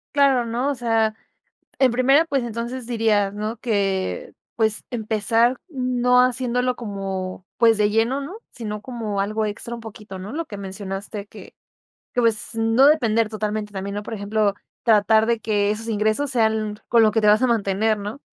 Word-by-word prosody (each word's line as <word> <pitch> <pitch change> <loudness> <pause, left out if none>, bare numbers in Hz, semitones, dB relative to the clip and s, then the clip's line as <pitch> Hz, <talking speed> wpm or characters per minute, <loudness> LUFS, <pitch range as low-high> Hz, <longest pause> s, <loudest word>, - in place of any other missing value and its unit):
Claro 270 -4 +4
¿no? 240 +4 -1
O 285 - -1
sea, 225 -3 +1 0.7
en 260 -2 +5
primera, 270 +6 +4
pues, 275 -5 -1
entonces 235 +2 -5
diría 220 -4 +1
¿no? 215 +3 -4
Que, 205 - -2 0.2
pues, 220 -1 0
empezar 225 +2 +1
no 250 -3 +2
haciéndolo 250 0 0
como, 195 -4 -5
pues 230 -1 +5
de 210 0 +2
lleno 230 +5 +1
¿no? 300 +9 -7 0.2
Sino 210 -3 -5
como 220 -5 -4
algo 215 +2 -1
extra 220 +3 -5
un 235 - -8
poquito 210 -3 -9
¿no? 195 +5 -7
Lo 330 +3 -3
que 210 -9 -9
mencionaste 195 +1 -6
que - - -13 0.6
que, 245 - +1
pues 225 0 +1
no 225 +5 +4
depender 230 -7 +3
totalmente 215 -1 -4
también 200 +1 -4
¿no? 205 - -4
Por 225 - -7
ejemplo, 205 0 0 0.3
tratar 220 -1 +4
de 235 0 +1
que 205 -1 +1
esos 225 +2 -4
ingresos 220 +6 0
sean 220 -3 0
con 230 -1 +5
lo 215 - +4
que 225 - +2
te 210 - +2
vas 210 +2 +5
a 255 - +3
mantener 215 -1 +1
¿no? 205 +6 -6
220 Hz, 175 wpm, -22 LUFS, 210-245 Hz, 0.7 s, en